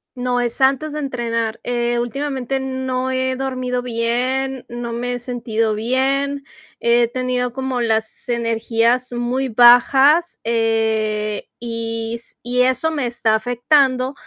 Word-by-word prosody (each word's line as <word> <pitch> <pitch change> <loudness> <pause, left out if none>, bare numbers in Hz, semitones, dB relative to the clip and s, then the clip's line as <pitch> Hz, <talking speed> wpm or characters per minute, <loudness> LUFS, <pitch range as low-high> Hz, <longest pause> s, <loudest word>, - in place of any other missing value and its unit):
No, 245 0 -1
es 240 -1 -3
antes 270 +3 +2
de 300 - -4
entrenar. 230 -4 -2
Eh, 240 0 -1
últimamente, 270 +1 -2
no 260 -1 -2
he 260 0 -1
dormido 255 -2 -2
bien, 250 +2 -1
no 240 -1 -5
me 245 +1 -3
he 245 - -3
sentido 230 -3 -1
bien. 270 +5 0 0.4
He 235 0 +3
tenido 250 0 -2
como 265 -1 -2
las 220 -2 -1
energías 235 +1 0
muy 245 +2 -1
bajas, 265 +7 +5
eh, 220 -2 0
y 230 -1 -4
s 235 0 -11
y 245 +1 +1
eso 260 +5 +1
me 290 -5 -1
está 235 -2 +1
afectando, 255 +3 +2
245 Hz, 130 wpm, -20 LUFS, 230-260 Hz, 0.4 s, bajas